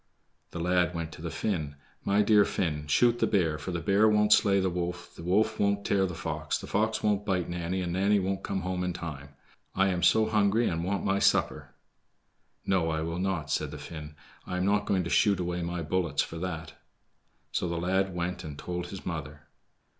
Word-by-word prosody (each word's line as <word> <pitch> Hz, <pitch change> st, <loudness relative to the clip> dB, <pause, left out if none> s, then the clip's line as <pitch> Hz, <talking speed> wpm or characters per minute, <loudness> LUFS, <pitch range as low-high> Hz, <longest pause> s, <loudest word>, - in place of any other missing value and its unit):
The -, -, -8 dB
lad 90 Hz, +1 st, +1 dB
went 85 Hz, -1 st, -4 dB
to -, -, -11 dB
the 85 Hz, -, -4 dB
Finn. 80 Hz, -8 st, -2 dB, 0.3 s
"My 100 Hz, +1 st, +3 dB
dear 105 Hz, -1 st, +6 dB
Finn, 75 Hz, -7 st, -2 dB
shoot 120 Hz, +9 st, +3 dB
the -, -, +3 dB
bear, 80 Hz, -7 st, +1 dB
for 75 Hz, -, -6 dB
the 85 Hz, -2 st, -2 dB
bear 100 Hz, +6 st, +4 dB
won't 105 Hz, 0 st, +5 dB
slay 100 Hz, -1 st, +4 dB
the 95 Hz, -, +1 dB
wolf, 90 Hz, 0 st, -4 dB
the -, -, -10 dB
wolf 95 Hz, +6 st, +1 dB
won't 100 Hz, 0 st, +1 dB
tear 95 Hz, -1 st, +2 dB
the 90 Hz, -, -6 dB
fox, 75 Hz, -1 st, -2 dB
the -, -, -8 dB
fox 110 Hz, +2 st, 0 dB
won't 105 Hz, -1 st, +2 dB
bite 95 Hz, -4 st, 0 dB
Nanny, 85 Hz, +2 st, -2 dB
and 85 Hz, -1 st, -2 dB
Nanny 100 Hz, +3 st, +3 dB
won't 95 Hz, 0 st, -2 dB
come 95 Hz, -1 st, -3 dB
home 90 Hz, 0 st, -2 dB
in 90 Hz, -1 st, -1 dB
time. 75 Hz, -5 st, -7 dB, 0.4 s
I 95 Hz, 0 st, +3 dB
am 90 Hz, -2 st, -1 dB
so 110 Hz, +4 st, +5 dB
hungry 110 Hz, +1 st, +2 dB
and 85 Hz, 0 st, -1 dB
want 100 Hz, +2 st, -1 dB
my 100 Hz, 0 st, +2 dB
supper." -, -, +1 dB, 0.9 s
"No, 90 Hz, -4 st, +1 dB
I 80 Hz, -1 st, -1 dB
will 85 Hz, +2 st, -3 dB
not," 90 Hz, -6 st, -2 dB
said 75 Hz, +1 st, 0 dB
the 75 Hz, -, -7 dB
Finn; 75 Hz, 0 st, -8 dB, 0.3 s
"I 90 Hz, -, -3 dB
am 90 Hz, -, 0 dB
not 105 Hz, +1 st, +1 dB
going 95 Hz, -2 st, +1 dB
to 85 Hz, -, -4 dB
shoot 100 Hz, -2 st, +3 dB
away 90 Hz, 0 st, -2 dB
my 85 Hz, 0 st, -3 dB
bullets 80 Hz, -3 st, 0 dB
for 80 Hz, -, -7 dB
that." 80 Hz, -3 st, -5 dB, 0.8 s
So 90 Hz, -, -1 dB
the 85 Hz, -, -2 dB
lad 95 Hz, +2 st, 0 dB
went 90 Hz, +1 st, -3 dB
and 75 Hz, -2 st, -7 dB
told 90 Hz, +2 st, -4 dB
his 95 Hz, +1 st, -9 dB
mother. 75 Hz, -4 st, -5 dB
90 Hz, 215 wpm, -28 LUFS, 85-100 Hz, 0.9 s, dear